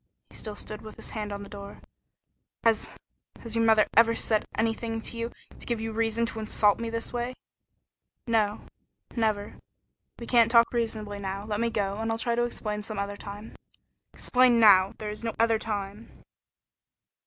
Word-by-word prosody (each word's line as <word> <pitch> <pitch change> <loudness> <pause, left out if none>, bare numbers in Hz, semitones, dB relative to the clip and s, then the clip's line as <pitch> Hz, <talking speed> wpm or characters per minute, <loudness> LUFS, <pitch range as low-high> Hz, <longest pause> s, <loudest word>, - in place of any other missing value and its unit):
He - - -14
still 215 -2 -5
stood 215 0 -7
with 215 - -10
his - - -9
hand 210 -2 -4
on 200 0 -5
the - - -9
door. 200 -1 -9 0.8
"Has 225 -2 +2 0.5
has 230 -1 -4
your 230 - +3
mother 220 -1 +5
ever 230 0 +6
said 215 -2 +1
anything 225 0 -1
to 225 - -6
you 230 0 -3 0.3
to - - -8
give 235 -2 -1
you 225 0 -3
reason 225 +1 +1
to 225 - -5
insult 215 -1 +2
me 230 0 -3
this 230 +1 -4
way?" 245 +1 -2 0.9
"No, 215 -3 +1 0.5
never. 215 -3 -1 0.6
We 235 - -7
can't 230 -1 +5
talk 230 0 +5
reasonably 215 -3 -2
now. 195 +1 -4
Let 210 -1 -2
me 235 - +2
go, 200 -2 -1
and 225 0 -1
I'll 225 - 0
try 235 +1 0
to 240 +1 +2
explain 210 -3 -4
some 215 0 -4
other 200 0 -2
time." 205 +2 -9 0.6
"Explain 250 -2 +4
now. 195 -3 +7
There 210 -1 -4
is 215 - -8
no 225 -1 -2
other 225 -1 +3
time." 210 0 -4
220 Hz, 180 wpm, -28 LUFS, 210-230 Hz, 0.9 s, now